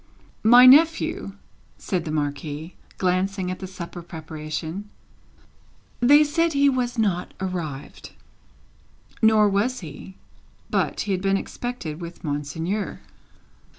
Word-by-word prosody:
"My 245 +3 +8
nephew," 315 - +5 0.4
said 180 -3 -3
the 155 - -3
Marquis, 150 +2 -3 0.2
glancing 185 0 0
at 185 - -6
the 190 - -6
supper 175 -1 -8
preparation; 160 +3 -6 1.1
"they 290 +5 +6
said 330 +2 +1
he 280 0 +4
was 250 -2 -1
not 195 -5 -1
arrived." 170 -7 -5 1.1
Nor 220 -1 +5
was 205 +5 0
he; 165 +3 -10 0.6
but, - - 0
he 205 - -3
had 185 -1 0
been 195 0 +2
expected 195 -8 -5
with 170 0 -9
Monseigneur. 160 +7 -3
190 Hz, 115 wpm, -24 LUFS, 160-240 Hz, 1.1 s, My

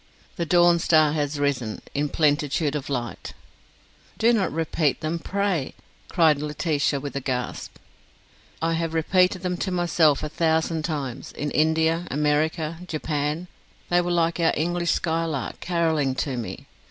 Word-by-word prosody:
'The 170 - -2
dawn 175 +1 +5
star 155 -3 +4
has 145 -1 -1
arisen 135 -6 -1
In 145 +1 0
plenitude 150 -1 +1
of 145 -2 -4
light.. 120 -5 -4 0.4
.'" - - -31
"Do 235 +2 +4
not 200 -6 +1
repeat 155 -1 0
them, 160 +2 -2
pray!" 195 -5 -1 0.3
cried 160 -4 +4
Laetitia, 150 -1 0
with 140 0 -6
a - - 0
gasp. 125 -2 -4 0.9
"I 165 0 +2
have 165 0 -2
repeated 180 +3 +2
them 180 -1 -1
to 190 - -2
myself 170 -5 +2
a - - -1
thousand 160 0 0
times: 140 -6 -4
in 145 0 -3
India, 160 +2 +2
America, 155 +3 0
Japan: 155 +1 -2 0.4
they 175 0 +4
were 175 - -3
like 170 -1 +1
our 165 -1 +3
English 175 +2 0
skylark, 160 -5 -1
carolling 160 -6 0
to 135 -1 -2
me. 120 -3 -6
160 Hz, 150 wpm, -24 LUFS, 145-170 Hz, 0.9 s, dawn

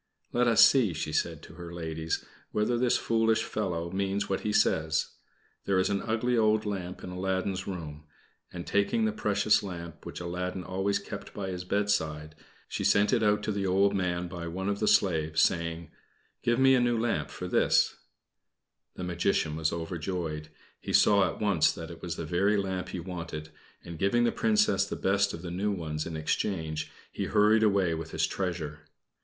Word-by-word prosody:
"Let 120 0 +3
us 115 - +8
see," 120 -10 +2
she 75 0 -4
said - - -1
to - - -12
her 85 -1 -9
ladies, 80 -1 -3 0.3
"whether 105 +3 +1
this 120 0 +2
foolish 115 -1 +2
fellow 85 -5 -3
means 100 +1 -1
what 95 - -1
he 105 - -2
says; 80 -6 +2 0.6
there 95 - +2
is 95 +2 +2
an 100 - 0
ugly 115 +2 0
old 110 -1 +3
lamp 95 -3 -4
in 90 - -6
Aladdin's 95 +1 -2
room," 75 -5 -6 0.5
and 85 -1 -7
taking 220 - +1
the 220 - +1
precious 210 - +2
lamp, 85 -4 -7
which - - -7
Aladdin 90 +1 -4
always 95 +3 0
kept 100 0 -8
by 95 -2 -3
his 90 -1 -4
bedside, 80 -6 -1 0.3
she - - -3
sent 100 +4 +3
it 120 - +3
out 105 -1 +2
to 110 - -1
the 100 -1 -1
old 100 +2 +3
man 90 -2 -1
by 85 -1 -6
one 95 +4 -3
of 100 0 -1
the 105 - 0
slaves, 80 -4 +3
saying 85 0 -1 0.5
"Give 120 0 +2
me 135 0 +6
a 130 - +5
new 120 -1 +2
lamp 120 0 -1
for - - -6
this!" - - +3 1.0
The - - -6
Magician 85 -3 0
was 80 -1 0
overjoyed. 80 -2 -4 0.3
He - - -5
saw 100 -3 +5
at - - -7
once 100 -7 +3
that - - -8
it - - -11
was - - -4
the - - -5
very 100 +4 +2
lamp 95 -2 -2
he 90 - -4
wanted, 85 -3 -6 0.3
and 85 -2 -8
giving 110 +5 +2
the 120 - +3
Princess 215 -1 +2
the - - -4
best 100 +1 +1
of 85 - -8
the 85 - -5
new 100 +4 -1
ones 80 -5 -3
in 80 -1 -5
exchange, 80 -1 -2 0.2
he - - -3
hurried 105 +1 +4
away 100 -5 +3
with 80 0 -5
his - - +1
treasure. 80 -5 -4
95 Hz, 190 wpm, -29 LUFS, 85-105 Hz, 1.0 s, us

